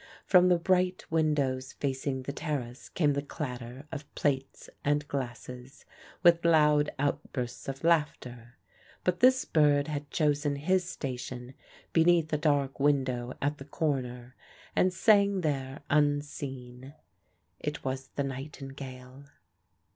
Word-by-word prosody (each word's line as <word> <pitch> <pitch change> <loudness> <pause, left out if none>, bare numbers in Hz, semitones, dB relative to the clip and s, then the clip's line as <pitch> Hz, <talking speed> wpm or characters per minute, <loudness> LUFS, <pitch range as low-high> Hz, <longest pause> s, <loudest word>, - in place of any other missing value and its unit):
From 180 -1 +6
the 180 - +5
bright 180 +1 +1
windows 145 -5 +1
facing 135 -1 -2
the 140 - -4
terrace 130 -6 -4
came 150 -4 +2
the 140 - -1
clatter 130 -2 -6
of 150 -2 -7
plates 135 -2 -1 0.2
and 145 0 +1
glasses, 125 0 -6 0.4
with 170 -1 +6
loud 150 -3 +4
outbursts 135 -3 -3
of 135 +1 -5
laughter. 125 -7 0 0.5
But 180 -1 +1
this 255 +1 +5
bird 145 -1 +3
had 145 -1 -4
chosen 145 -2 +1
his 180 +5 +1
station 125 -3 -5 0.4
beneath 165 -1 +4
a - - +3
dark 145 -3 +1
window 130 -4 +1
at 145 +1 0
the 135 - -8
corner, 130 -5 -2 0.4
and 185 - +4
sang 200 +1 +4
there 135 -3 -2
unseen. 140 -3 -1 0.6
It 150 0 -4
was 130 0 -3
the 140 - 0
nightingale. 135 -1 -8
145 Hz, 125 wpm, -29 LUFS, 130-155 Hz, 0.6 s, From